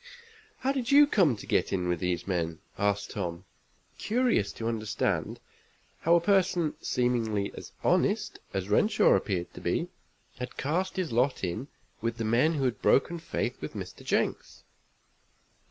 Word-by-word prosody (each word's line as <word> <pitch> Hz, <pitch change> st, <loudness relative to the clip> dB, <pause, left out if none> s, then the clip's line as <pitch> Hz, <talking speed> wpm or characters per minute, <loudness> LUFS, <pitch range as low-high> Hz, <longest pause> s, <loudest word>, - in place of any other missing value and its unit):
"How 265 Hz, -, +1 dB
did 265 Hz, -2 st, -2 dB
you 290 Hz, +1 st, +8 dB
come 185 Hz, -, +3 dB
to 105 Hz, -, -10 dB
get -, -, +1 dB
in 90 Hz, -2 st, 0 dB
with 90 Hz, -1 st, 0 dB
these 90 Hz, -1 st, -1 dB
men?" 85 Hz, -4 st, -1 dB, 0.2 s
asked 100 Hz, 0 st, 0 dB
Tom, 90 Hz, -2 st, -4 dB, 0.5 s
curious 230 Hz, -, +1 dB
to 115 Hz, -, -4 dB
understand 110 Hz, -2 st, -1 dB, 0.6 s
how 170 Hz, +1 st, +4 dB
a -, -, +6 dB
person 175 Hz, -3 st, +2 dB
seemingly 115 Hz, -5 st, 0 dB
as -, -, -9 dB
honest -, -, +1 dB
as 95 Hz, -1 st, -3 dB
Renshaw 210 Hz, -, +4 dB
appeared 90 Hz, -4 st, -1 dB
to -, -, -10 dB
be -, -, -1 dB, 0.5 s
had 125 Hz, -, -6 dB
cast 175 Hz, +7 st, -1 dB
his 185 Hz, -7 st, -2 dB
lot 125 Hz, +2 st, +1 dB
in 95 Hz, +9 st, -3 dB, 0.3 s
with 115 Hz, +1 st, -2 dB
the 115 Hz, -, -2 dB
men 125 Hz, +9 st, +3 dB
who 145 Hz, -4 st, -1 dB
had 125 Hz, -2 st, -1 dB
broken 170 Hz, +5 st, +3 dB
faith 165 Hz, -, -3 dB
with -, -, -5 dB
Mr. -, -, -7 dB
Jenks. -, -, -1 dB
120 Hz, 155 wpm, -29 LUFS, -, 0.6 s, you